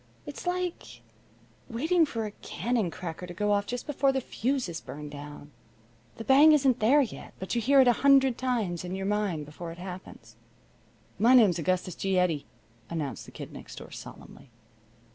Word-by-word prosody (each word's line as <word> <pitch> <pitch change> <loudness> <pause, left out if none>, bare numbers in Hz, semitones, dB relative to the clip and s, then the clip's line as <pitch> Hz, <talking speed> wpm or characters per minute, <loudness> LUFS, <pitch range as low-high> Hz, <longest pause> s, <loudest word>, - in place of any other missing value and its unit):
It's - - -8
like 360 -1 -3 0.7
waiting 320 +8 +2
for 225 -5 -3
a 210 - -5
cannon 225 -1 -2
cracker 170 +1 -7
to 175 - -9
go 210 +3 0
off 205 0 +1
just 245 0 -4
before 275 -1 +2
the 265 - 0
fuse 260 0 -2
is 165 -1 -6
burned 150 0 -8
down. 145 0 -10 0.6
The 225 - -7
bang 285 +5 +7
isn't 265 -4 +3
there 260 +7 +5
yet, 225 - -8
but 190 - -5
you 235 - +1
hear 275 +4 +5
it 260 - +4
a 245 - +6
hundred 270 -2 +5
times 230 -10 -1
in 180 +1 -4
your 190 0 -4
mind 200 -7 -1
before 165 +3 -8
it 165 - -10
happens." 185 +1 -10 0.8
"My 240 +4 +6
name's 205 -9 +5
Augustus 185 +2 -1
G. 195 +2 -1
Eddy," 165 -6 +1 0.4
announced 150 -7 -4
the - - -13
Kid - - -9
Next - - -10
Door, - - -10
solemnly. - - -11
210 Hz, 180 wpm, -28 LUFS, 175-260 Hz, 0.8 s, bang